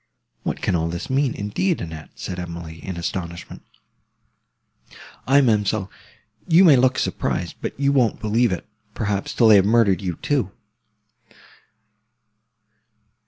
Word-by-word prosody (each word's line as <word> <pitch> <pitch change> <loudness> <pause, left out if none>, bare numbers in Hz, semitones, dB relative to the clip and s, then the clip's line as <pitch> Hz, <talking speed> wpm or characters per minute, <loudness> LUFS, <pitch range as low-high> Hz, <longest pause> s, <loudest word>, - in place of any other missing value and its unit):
"What - - -4
can - - +1
all 80 -1 0
this 85 +8 -5
mean, 135 -1 +1
indeed, 135 - -1
Annette?" 80 -3 -7
said 90 - -6
Emily, 85 -2 -8
in 95 -3 -5
astonishment. 85 0 -5 1.7
"Aye, 140 +2 +5
ma'amselle, 105 -4 +1 0.6
you 170 +3 +6
may 160 -6 +7
look 130 +1 +3
surprised; - - -2
but - - -5
you 140 0 +2
won't 125 -5 +2
believe 115 +1 +1
it, 90 - -4 0.3
perhaps, 100 -2 -2
till 115 -3 +4
they 105 - +8
have 95 - +5
murdered 105 -3 +3
you, 90 -3 -3
too. 130 - -1
105 Hz, 130 wpm, -22 LUFS, 90-130 Hz, 1.7 s, they